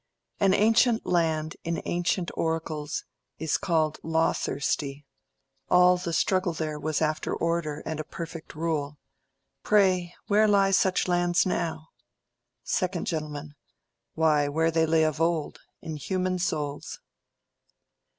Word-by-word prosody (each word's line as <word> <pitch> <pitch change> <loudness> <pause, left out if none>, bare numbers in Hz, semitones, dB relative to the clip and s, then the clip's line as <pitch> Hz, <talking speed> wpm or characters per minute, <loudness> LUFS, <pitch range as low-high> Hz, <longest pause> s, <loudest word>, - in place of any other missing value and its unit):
An 195 -2 +4
ancient 225 +2 +3
land 160 -3 0
in 170 0 -2
ancient 175 0 -1
oracles 160 -2 -2 0.3
Is 160 -2 -1
called 155 -3 0
"law 160 0 +1
thirsty": 140 0 -2 0.6
all 180 0 +6
the 180 -1 -4
struggle 185 +2 +1
there 155 -2 -3
Was 155 0 -1
after 155 0 -1
order 165 -3 -2
and 160 -1 -4
a - - -2
perfect 165 0 -8
rule. 150 -2 -2 0.6
Pray, 185 -4 +2
where 215 +1 +4
lie 200 -1 +4
such 190 -1 +2
lands 175 0 +2
now?... 160 -3 -2 0.8
2_d 180 -2 -1
Gent_. 150 -3 -4 0.6
Why, 155 -2 +3
where 160 +3 +1
they 160 0 +2
lay 160 0 +3
of 155 0 0
old—in 165 0 -3
human 185 +3 -1
souls. 150 -5 -3
165 Hz, 120 wpm, -27 LUFS, 155-180 Hz, 0.8 s, all